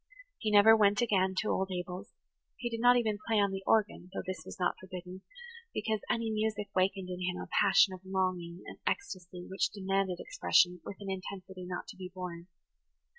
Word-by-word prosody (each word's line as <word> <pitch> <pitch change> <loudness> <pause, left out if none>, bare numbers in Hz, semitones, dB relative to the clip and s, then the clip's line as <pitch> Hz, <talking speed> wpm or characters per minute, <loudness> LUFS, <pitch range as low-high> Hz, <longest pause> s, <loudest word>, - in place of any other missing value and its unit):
He 220 - -1
never 210 +2 +8
went 205 -1 +4
again 190 -4 +2
to 215 - 0
old 190 0 0
Abel's; 180 0 -5 0.5
he 240 -1 -3
did 230 - -3
not 245 +1 +7
even 215 -3 0
play 220 -2 +3
on 200 -1 +3
the 195 0 -3
organ, 205 -4 +2
though - - -4
this 185 -3 -4
was - - -10
not 180 - +2
forbidden, 185 0 -8 0.5
because 220 0 0
any 230 -1 0
music 215 -1 -1
wakened 190 0 +1
in 180 0 -4
him 180 0 -1
a - - -6
passion 195 -1 +5
of 185 - -9
longing 185 -2 -2
and - - -10
ecstasy 180 - -3
which 190 - 0
demanded 195 -2 -1
expression 180 - +2
with 200 - -7
an 195 -1 -4
intensity 185 -1 -6
not 175 -1 -4
to - - -10
be 185 -1 -7
borne. 180 -2 -7
190 Hz, 190 wpm, -32 LUFS, 180-210 Hz, 0.5 s, never